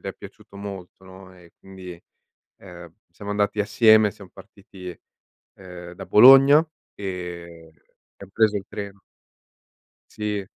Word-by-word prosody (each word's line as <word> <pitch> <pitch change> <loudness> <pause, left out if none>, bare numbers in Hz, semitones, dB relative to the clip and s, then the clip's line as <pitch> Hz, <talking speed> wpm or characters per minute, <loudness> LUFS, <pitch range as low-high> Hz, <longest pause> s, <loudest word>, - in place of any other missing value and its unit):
è - - -5
piaciuto 100 - -15
molto, 95 -2 -10
no, 95 0 -15
e 85 -1 -20
quindi, 95 -2 -12 0.6
ehm, 85 -3 -13 0.2
siamo 100 +3 -9
andati 105 0 -1
assieme. 110 0 +4
Siam 100 -4 -15
partiti, 95 -4 -13 0.6
ehm, 90 -2 -11
da - - -10
Bologna 135 - +7 0.3
e 85 -4 -8 0.5
abbiam 100 - -14
preso 110 -1 +2
il 95 - -5
treno. 100 -1 -9 1.1
Sì. 105 -2 -4
95 Hz, 120 wpm, -22 LUFS, 90-105 Hz, 1.1 s, Bologna